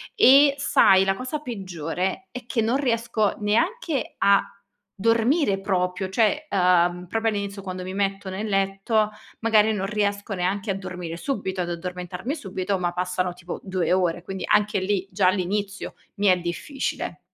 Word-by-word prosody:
E 275 +2 +7
sai, 195 -8 +5
la 195 0 +1
cosa 255 +6 -4
peggiore 190 - -4
è 250 -1 -8
che 230 -1 -2
non 230 +3 +1
riesco 230 -5 0
neanche 310 - 0
a 200 0 +4 0.5
dormire 230 - +2
proprio, 185 -1 -1
cioè, 240 +10 +1
uhm, 180 -1 +3
proprio 225 +3 0
all'inizio 200 -1 -4
quando 185 -1 -6
mi 185 +1 -6
metto 195 -1 -1
nel 200 +4 -4
letto, 195 +2 +1 0.3
magari 220 -1 +4
non 195 -2 -2
riesco 205 0 -1
neanche 195 +2 -1
a - - -2
dormire 180 -3 -6
subito 190 -4 -3
ad 175 - -3
addormentarmi 180 - -4
subito, 195 - -3
ma 175 -1 0
passano 180 0 -1
tipo 175 0 -8
2 185 -2 0
ore, 175 -2 +1
quindi 190 0 -6
anche 210 -1 +2
lì, 195 0 -1
già 185 0 +2
all'inizio 195 +1 -1 0.2
mi 205 0 +1
è 185 -1 +5
difficile. 175 - -4
195 Hz, 155 wpm, -24 LUFS, 185-220 Hz, 0.5 s, E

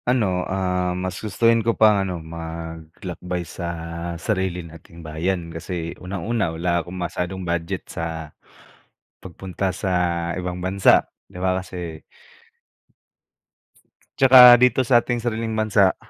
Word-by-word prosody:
Ano, 100 -8 +1
ah, 90 -1 -1
mas 95 0 -4
gustuhin 115 +2 +2
ko 115 +1 0
pang 105 -2 +5
ano 95 -2 -3
maglakbay 80 +2 -7
sa 85 - -7 0.5
sarili 95 -2 -2
nating 85 0 -13
bayan 85 +2 -3
kasi 85 0 -5
unang-una 100 +2 -2
wala 85 0 0
akong 90 +2 -9
masyadong 90 +1 -4
budget 85 -1 -3
sa, 80 -2 -6 0.9
pagpunta 95 +1 -4
sa 95 0 -2 0.5
ibang 90 0 -4
bansa 95 +1 +4 0.2
di - - -12
ba, 95 0 +1
kasi 85 -4 -7 2.2
Tsaka 125 -2 +9
dito 125 +1 +4
sa 120 -1 +5
ating 120 -1 -3
sariling 115 -1 -2
bansa, 105 -3 +3
90 Hz, 120 wpm, -22 LUFS, 85-105 Hz, 2.2 s, Tsaka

